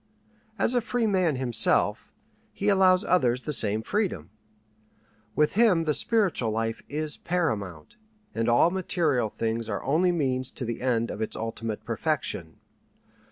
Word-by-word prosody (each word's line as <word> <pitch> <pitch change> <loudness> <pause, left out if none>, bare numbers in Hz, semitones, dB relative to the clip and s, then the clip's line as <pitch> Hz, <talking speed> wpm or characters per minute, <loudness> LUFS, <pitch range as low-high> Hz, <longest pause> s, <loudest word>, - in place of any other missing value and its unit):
As 240 - +1
a 245 - +2
free 240 +1 -1
man 185 -7 +1
himself, 125 -2 +1 0.4
he 205 - -1
allows 185 -2 +4
others 125 -7 +1
the 150 - -1
same 110 -3 +2
freedom. 175 - -2 1.0
With 150 0 +2
him 205 -6 +3
the 155 -2 0
spiritual 195 - +2
life 115 +1 -2
is 150 0 -3
paramount, 110 - -3 0.4
and 115 +1 -1
all 120 +8 +4
material 160 - 0
things 115 +1 -3
are 100 - -3
only 170 +6 +2
means 130 -6 -1
to 125 - -6
the 115 0 -5
end 120 -2 0
of - - -7
its 110 - -3
ultimate 115 -1 -5
perfection. - - -3
135 Hz, 145 wpm, -26 LUFS, 115-180 Hz, 1.0 s, allows